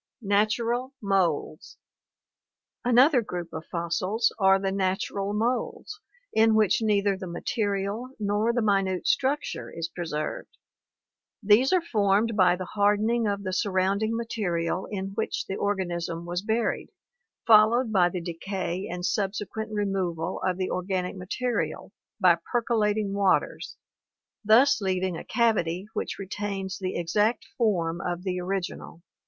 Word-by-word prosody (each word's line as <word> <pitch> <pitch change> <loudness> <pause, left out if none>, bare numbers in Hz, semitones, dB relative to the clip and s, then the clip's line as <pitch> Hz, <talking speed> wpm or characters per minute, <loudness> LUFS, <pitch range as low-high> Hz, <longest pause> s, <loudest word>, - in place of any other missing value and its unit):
Natural 230 +6 0
Moulds. 185 -6 -1 0.6
— - - -65 0.3
Another 250 +3 +5
group 175 -5 -6
of 160 0 -7
fossils 185 +6 0
are 195 -1 +5
the 195 0 -1
natural 195 +1 -1
moulds 245 - -2 0.3
in 220 0 +4
which 215 0 +3
neither 205 -2 +2
the 190 -1 -7
material 200 +4 -2
nor 210 +2 +1
the 240 -1 0
minute 195 -3 +1
structure 280 +3 0
is 165 0 -5
preserved. 160 -4 -4 0.9
These 215 +6 +5
are 365 -2 +3
formed 210 -4 +1
by 180 -3 +5
the 185 0 -5
hardening 210 +4 +1
of 200 0 -2
the 185 -1 -3
surrounding 200 +3 +1
material 190 -6 -2
in 195 -2 -4
which 220 +2 -2
the 195 - -4
organism 175 -4 -2
was 175 +1 -2
buried, 225 +2 -1 0.6
followed 225 +2 +5
by 180 -4 +4
the 180 0 -4
decay 185 +2 -4
and 180 0 -4
subsequent 210 +2 -2
removal 190 -5 -2
of 185 -1 0
the 185 -1 -2
organic 185 0 -2
material 230 +6 -3 0.3
by 175 -4 +5
percolating 215 -4 +1
waters, 200 -2 0 0.7
thus 225 +4 +5
leaving 185 -2 -1
a - - -6
cavity 200 -6 +1
which 215 - -3
retains 195 -1 -4
the 185 -1 -3
exact 205 +7 +1
form 170 -8 0
of 175 0 -3
the 185 -2 -2
original. 180 -2 -4
200 Hz, 130 wpm, -26 LUFS, 180-220 Hz, 0.9 s, Another